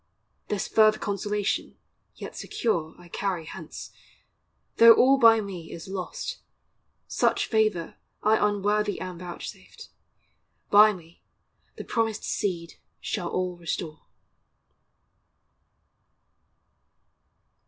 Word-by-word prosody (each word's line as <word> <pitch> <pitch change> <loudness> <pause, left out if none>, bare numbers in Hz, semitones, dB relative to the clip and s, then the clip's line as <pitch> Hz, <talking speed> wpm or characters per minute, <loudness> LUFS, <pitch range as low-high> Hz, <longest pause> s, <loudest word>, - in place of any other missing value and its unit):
This 210 - -2
further 215 -1 +4
consolation, 205 0 -2 0.4
yet - - -9
secure, 165 -9 -2
I 175 - -15
carry 180 -2 -3
hence; - - -9 0.9
though 230 0 +10
all 270 +2 +5
by 225 -2 +7
me 185 -5 -8
is 165 +1 -8
lost, 190 -1 -5 0.7
Such - - +1
favor 215 -7 0 0.3
I 215 0 +3
unworthy 205 +1 0
am 185 -2 -6
vouchsafed, 180 - -9 0.8
By 210 +1 +8
me 170 -4 -13 0.5
the - - -7
promised 225 -2 -1
Seed 170 -4 -3 0.2
shall 180 -5 -3
all 180 -1 -2
restore. 165 -2 -5
200 Hz, 95 wpm, -26 LUFS, 175-215 Hz, 0.9 s, though